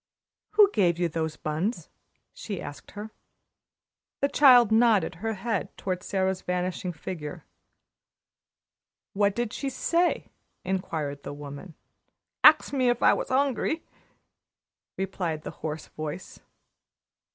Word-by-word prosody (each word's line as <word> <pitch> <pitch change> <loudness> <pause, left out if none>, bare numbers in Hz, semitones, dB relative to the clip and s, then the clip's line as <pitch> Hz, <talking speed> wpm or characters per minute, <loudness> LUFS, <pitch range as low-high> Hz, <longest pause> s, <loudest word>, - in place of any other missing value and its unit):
"Who 415 -1 +6
gave 175 -5 +3
you 175 0 +1
those 160 -1 -2
buns?" 165 +10 -3 0.5
she 200 -4 -6
asked 145 - -9
her. 210 +1 -7 1.1
The 280 - +2
child 250 -7 +7
nodded 220 -6 +4
her 225 0 -1
head 205 0 -2
toward 185 -2 -3
Sara's 190 -1 -1
vanishing 180 0 -2
figure. 160 -2 -7 1.7
"What 200 0 +2
did 235 -2 -2
she 275 - -3
say?" 335 +6 0 0.3
inquired 160 -6 -3
the - - -7
woman. 145 +4 -9 0.7
"Axed - - +7
me 255 -3 +2
if 240 -1 0
I - - +7
was - - -3
'ungry," 275 +4 +1 1.1
replied 175 -5 -3
the - - -5
hoarse 155 0 -4
voice. 155 +3 -7
190 Hz, 120 wpm, -27 LUFS, 160-235 Hz, 1.7 s, child